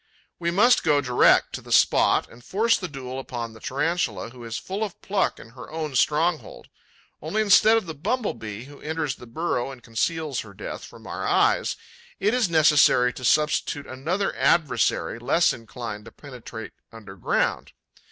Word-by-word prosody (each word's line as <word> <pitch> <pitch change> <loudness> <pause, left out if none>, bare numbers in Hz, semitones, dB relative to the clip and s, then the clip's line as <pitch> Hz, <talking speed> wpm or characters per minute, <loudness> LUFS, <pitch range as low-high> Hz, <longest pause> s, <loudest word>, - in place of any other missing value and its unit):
We 170 -1 -1
must 215 +8 +4
go 150 -3 +3
direct 125 -3 +3
to - - -5
the - - -12
spot - - +4
and 120 +1 -17
force 225 - +2
the 185 - -4
duel 130 -4 -7
upon 120 -3 -6
the 110 - -14
Tarantula, 150 +1 -2
who 125 -1 -12
is 115 -1 -5
full 195 +3 -4
of 205 -5 -6
pluck 195 0 0
in - - -13
her 125 -1 -11
own 155 -2 -4
stronghold. 175 - 0 0.5
Only, 215 0 0
instead 215 +2 +6
of 220 - -2
the 160 - -6
Bumble 215 - -2
bee, 110 -1 -8
who 140 +2 -14
enters 155 -3 -3
the 120 - -12
burrow 130 -1 -2
and 130 -3 -11
conceals 145 +5 -2
her 100 -3 -9
death - - -7
from - - -13
our - - -4
eyes, - - +2 0.4
it 210 +3 +1
is 245 -7 +2
necessary 150 -6 +4
to 130 - -10
substitute 150 +1 +1
another 165 +10 -2
adversary, 130 -7 +1
less 165 +8 +2
inclined 115 -2 -8
to - - -11
penetrate 125 -5 -10 0.2
underground. 100 -5 -2
145 Hz, 170 wpm, -24 LUFS, 120-175 Hz, 0.5 s, instead